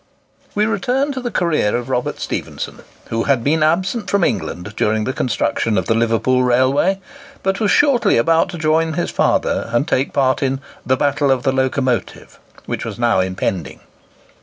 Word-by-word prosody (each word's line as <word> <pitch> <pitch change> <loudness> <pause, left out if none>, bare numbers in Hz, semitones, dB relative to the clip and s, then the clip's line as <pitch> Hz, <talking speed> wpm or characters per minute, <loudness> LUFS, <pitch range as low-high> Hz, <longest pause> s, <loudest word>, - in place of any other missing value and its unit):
We 210 +1 +2
return 250 +7 0
to 260 -1 -4
the 245 - -3
career 165 - +1
of 120 0 -3
Robert 125 -2 -2
Stephenson, - - -5 0.3
who 115 0 -1
had 135 -5 +2
been 155 +4 +1
absent 185 +8 +1
from 200 -2 +2
England 90 - -2
during 110 0 +1
the 130 - -2
construction 115 -4 0
of 95 - 0
the 115 - +2
Liverpool 115 +3 +2
railway, 130 +10 +2 0.4
but 195 +1 0
was 215 -2 +1
shortly 280 - +4
about 165 +9 +3
to 175 - -6
join 160 +1 +1
his 175 - -2
father - - 0
and 120 +6 +1
take 135 -3 0
part 130 -2 +1
in 135 -1 0 0.2
"the 130 +1 +1
battle 145 0 +1
of 130 -2 +2
the 135 - +2
locomotive," 130 -4 -2 0.3
which - - -4
was - - -6
now 120 -4 +2
impending. 95 -4 -2
135 Hz, 175 wpm, -19 LUFS, 120-175 Hz, 0.4 s, shortly